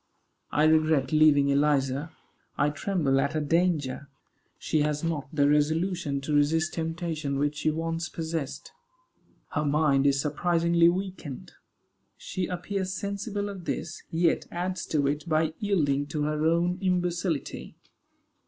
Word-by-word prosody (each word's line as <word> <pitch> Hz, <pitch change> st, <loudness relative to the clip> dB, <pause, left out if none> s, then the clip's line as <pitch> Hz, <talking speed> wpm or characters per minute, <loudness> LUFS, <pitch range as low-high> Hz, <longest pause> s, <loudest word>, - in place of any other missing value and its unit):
I 150 Hz, -, +1 dB
regret 155 Hz, -3 st, +3 dB
leaving 150 Hz, -2 st, +5 dB
Eliza. 140 Hz, +1 st, +1 dB, 0.5 s
I 145 Hz, -, +2 dB
tremble 145 Hz, -4 st, 0 dB
at 140 Hz, +2 st, -1 dB
her 155 Hz, -, 0 dB
danger. 150 Hz, -4 st, 0 dB, 0.5 s
She 155 Hz, -, 0 dB
has 150 Hz, 0 st, -1 dB
not 160 Hz, -4 st, -2 dB
the 145 Hz, -3 st, +2 dB
resolution 150 Hz, 0 st, +1 dB
to 150 Hz, +2 st, -3 dB
resist 160 Hz, +3 st, +2 dB
temptation 160 Hz, -3 st, -3 dB
which 145 Hz, +1 st, 0 dB
she 155 Hz, -, +1 dB
once 165 Hz, +2 st, -2 dB
possessed. 160 Hz, -4 st, -4 dB, 0.8 s
Her -, -, 0 dB
mind 145 Hz, -2 st, +3 dB
is 140 Hz, -1 st, +3 dB
surprisingly 170 Hz, +3 st, +3 dB
weakened. 180 Hz, -7 st, -5 dB, 0.7 s
She 185 Hz, -2 st, -4 dB
appears 185 Hz, +1 st, -3 dB
sensible 200 Hz, +1 st, -3 dB
of 195 Hz, -4 st, -7 dB
this, 155 Hz, -, -4 dB
yet 165 Hz, 0 st, +1 dB
adds 180 Hz, 0 st, -3 dB
to 145 Hz, -3 st, +1 dB
it 145 Hz, +4 st, -2 dB
by 155 Hz, 0 st, +1 dB
yielding 145 Hz, -9 st, +1 dB
to 150 Hz, 0 st, -2 dB
her 150 Hz, +1 st, 0 dB
own 175 Hz, +2 st, +1 dB
imbecility. 180 Hz, -3 st, -1 dB
155 Hz, 135 wpm, -27 LUFS, 145-175 Hz, 0.8 s, leaving